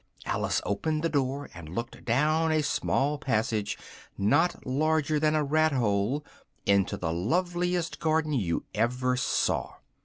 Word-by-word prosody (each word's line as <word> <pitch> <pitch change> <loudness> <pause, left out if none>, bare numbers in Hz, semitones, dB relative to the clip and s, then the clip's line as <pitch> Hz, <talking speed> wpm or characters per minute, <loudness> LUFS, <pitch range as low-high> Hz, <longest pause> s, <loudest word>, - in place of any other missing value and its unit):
Alice - - 0
opened 155 +10 -1
the 165 - +2
door, 140 -1 -1
and 85 -3 -9
looked 115 +9 -5
down 155 +7 +2
a 155 -1 +2
small 145 0 0
passage, 110 -4 0 0.4
not 105 - +2
larger 155 +3 +1
than 155 0 +2
a 155 - +2
rat 155 +1 +2
hole, 115 +4 0 0.4
into 100 -1 +2
the 80 -2 -2
loveliest 175 - 0
garden 155 -1 +1
you 95 -11 -1
ever 125 +3 +1
saw. 125 - 0
140 Hz, 135 wpm, -28 LUFS, 110-155 Hz, 0.4 s, the